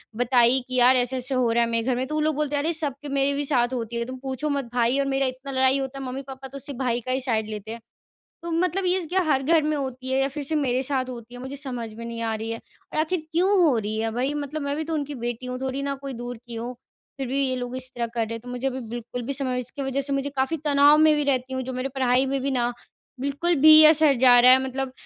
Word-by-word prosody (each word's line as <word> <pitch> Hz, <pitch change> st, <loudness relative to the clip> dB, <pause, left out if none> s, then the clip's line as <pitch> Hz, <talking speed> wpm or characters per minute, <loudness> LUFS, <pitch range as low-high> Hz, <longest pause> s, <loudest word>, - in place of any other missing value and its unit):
बताई 245 Hz, +1 st, +4 dB
कि, 255 Hz, -, -4 dB
यार 250 Hz, +1 st, +6 dB
ऐसे-ऐसे 255 Hz, +1 st, -1 dB
हो 250 Hz, -2 st, +2 dB
रहा 235 Hz, +1 st, +3 dB
है 230 Hz, -, -1 dB
मेरे 230 Hz, 0 st, 0 dB
घर 255 Hz, -, +2 dB
में, 255 Hz, +1 st, -1 dB
तो 305 Hz, -, -4 dB
वो 310 Hz, -, +1 dB
लोग 310 Hz, 0 st, +1 dB
बोलते 295 Hz, 0 st, -1 dB
हैं, 285 Hz, -, 0 dB
अरे 330 Hz, +2 st, 0 dB
सबके 295 Hz, -3 st, -4 dB
मेरे 275 Hz, 0 st, +1 dB
भी 285 Hz, +1 st, -1 dB
साथ 250 Hz, -3 st, +1 dB
होती 235 Hz, -2 st, -4 dB
है, 235 Hz, 0 st, -1 dB
तुम 260 Hz, +1 st, -7 dB
पूछो 265 Hz, +3 st, -3 dB
मत 280 Hz, -2 st, -1 dB
भाई 245 Hz, +2 st, +2 dB
और 280 Hz, -, +1 dB
मेरा 270 Hz, 0 st, +1 dB
इतना 260 Hz, +2 st, -6 dB
लड़ाई 265 Hz, 0 st, +3 dB
होता 270 Hz, 0 st, -5 dB
है, 270 Hz, -, -5 dB
मम्मी-पापा 265 Hz, +1 st, -7 dB
तो 275 Hz, +1 st, -9 dB
सिर्फ़ 270 Hz, -1 st, -9 dB
भाई 245 Hz, -2 st, 0 dB
का 255 Hz, -, -2 dB
ही 260 Hz, +1 st, 0 dB
साइड 225 Hz, -4 st, -1 dB
लेते 215 Hz, 0 st, -6 dB
हैं। 230 Hz, -, -7 dB, 0.6 s
तो 340 Hz, -, -5 dB
मतलब 360 Hz, +3 st, 0 dB
ये 365 Hz, +1 st, +3 dB
क्या 365 Hz, +4 st, +1 dB
हर 295 Hz, -5 st, +1 dB
घर 320 Hz, +3 st, +3 dB
में 305 Hz, 0 st, 0 dB
होती 260 Hz, -2 st, -5 dB
है 265 Hz, -, +2 dB
या 270 Hz, -, +2 dB
फिर 295 Hz, +1 st, -4 dB
से 315 Hz, -, -3 dB
मेरे 260 Hz, -3 st, +1 dB
साथ 260 Hz, -1 st, -2 dB
होती 240 Hz, -1 st, -9 dB
है, 245 Hz, -, -9 dB
मुझे 265 Hz, +2 st, -6 dB
समझ 245 Hz, -5 st, -6 dB
में 230 Hz, +1 st, -8 dB
नहीं 230 Hz, 0 st, -6 dB
आ 225 Hz, -1 st, -1 dB
रही 220 Hz, +1 st, -4 dB
है 230 Hz, -, -4 dB, 0.3 s
और -, -, -3 dB
आख़िर 320 Hz, +3 st, 0 dB
क्यों 350 Hz, +4 st, +2 dB
हो 300 Hz, -7 st, +4 dB
रही 215 Hz, 0 st, -3 dB
है 225 Hz, 0 st, -1 dB
भाई? 255 Hz, +5 st, -1 dB
मतलब 295 Hz, +1 st, -4 dB
मैं 280 Hz, 0 st, -2 dB
भी 315 Hz, -, -2 dB
तो 325 Hz, +1 st, -3 dB
उनकी 290 Hz, -1 st, -3 dB
बेटी 240 Hz, 0 st, -5 dB
हूँ, 250 Hz, 0 st, -4 dB
थोड़ी 265 Hz, +1 st, -3 dB
ना 280 Hz, 0 st, -2 dB
कोई 275 Hz, 0 st, -7 dB
दूर 245 Hz, 0 st, -6 dB
की 235 Hz, -, -7 dB
हूँ। 235 Hz, +2 st, -5 dB, 0.4 s
फिर 270 Hz, -, -3 dB
भी 275 Hz, +2 st, 0 dB
ये 255 Hz, -, -1 dB
लोग 245 Hz, 0 st, -4 dB
इस 255 Hz, 0 st, -6 dB
तरह 235 Hz, -1 st, -1 dB
कर 230 Hz, 0 st, -5 dB
रहे 225 Hz, -, -6 dB
हैं, 230 Hz, -, -6 dB
तो 245 Hz, -, -13 dB
मुझे 250 Hz, +2 st, -2 dB
भी 260 Hz, 0 st, -5 dB
बिल्कुल 240 Hz, +1 st, -6 dB
भी 260 Hz, +4 st, -3 dB
समझ 260 Hz, -2 st, -2 dB
इसकी 255 Hz, +3 st, -7 dB
वजह 270 Hz, 0 st, -1 dB
से 280 Hz, +1 st, -4 dB
मुझे 275 Hz, +1 st, -1 dB
काफ़ी 265 Hz, +5 st, 0 dB
तनाव 290 Hz, 0 st, +6 dB
में 310 Hz, 0 st, +6 dB
भी 295 Hz, -, 0 dB
रहती 265 Hz, -2 st, 0 dB
हूँ, 260 Hz, -, -2 dB
जो 260 Hz, +1 st, -5 dB
मेरे 255 Hz, +1 st, -3 dB
पढ़ाई 260 Hz, 0 st, +2 dB
में 270 Hz, 0 st, -1 dB
भी 275 Hz, -, -1 dB
ना 245 Hz, -2 st, 0 dB, 0.5 s
बिल्कुल 285 Hz, +6 st, 0 dB
भी 310 Hz, +1 st, +9 dB
असर 310 Hz, -2 st, +6 dB
जा 245 Hz, -1 st, +7 dB
रहा 250 Hz, +1 st, +8 dB
है 260 Hz, 0 st, +5 dB
मतलब 265 Hz, 0 st, -4 dB
265 Hz, 290 wpm, -24 LUFS, 245-280 Hz, 0.6 s, भी